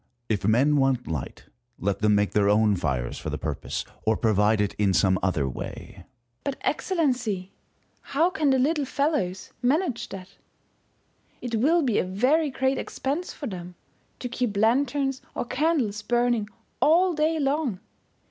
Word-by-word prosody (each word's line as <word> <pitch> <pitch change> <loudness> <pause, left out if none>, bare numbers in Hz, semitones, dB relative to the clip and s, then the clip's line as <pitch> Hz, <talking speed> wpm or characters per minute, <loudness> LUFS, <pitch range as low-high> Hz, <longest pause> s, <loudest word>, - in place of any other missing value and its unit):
If 105 -2 0
men 135 +7 +4
want 135 -2 +2
light, 80 -6 -5 0.3
let 100 +2 -1
them 105 0 +3
make 105 0 +2
their 100 -1 +3
own 105 0 +4
fires 65 -9 -2
for - - -5
the - - -3
purpose, - - -4 0.2
or 110 0 +2
provide 110 -1 +2
it 105 -1 0
in 100 -3 +3
some 95 -2 +3
other 80 -8 0
way. 65 - -7
First - - -15
Hour. - - -15 0.4
But, 280 - -1
Excellency, 245 - -1 0.5
how 325 +6 +1
can 310 -6 +1
the 265 - +4
little 290 +3 +1
fellows 270 - -1
manage 265 0 0
that? 190 -1 -8 1.1
It 245 -2 -6
will 320 +8 +3
be 240 -6 +2
a - - +2
very 255 - +2
great 265 0 0
expense 295 +7 -3
for 290 - -8
them 180 -5 -7 0.4
to 250 - -5
keep 245 -4 -2
lanterns 270 +4 +1
or - - -2
candles 255 -6 0
burning 240 -1 +1 0.3
all 350 +4 +4
day 315 +1 +1
long. 275 -7 0
235 Hz, 160 wpm, -26 LUFS, -, 1.1 s, men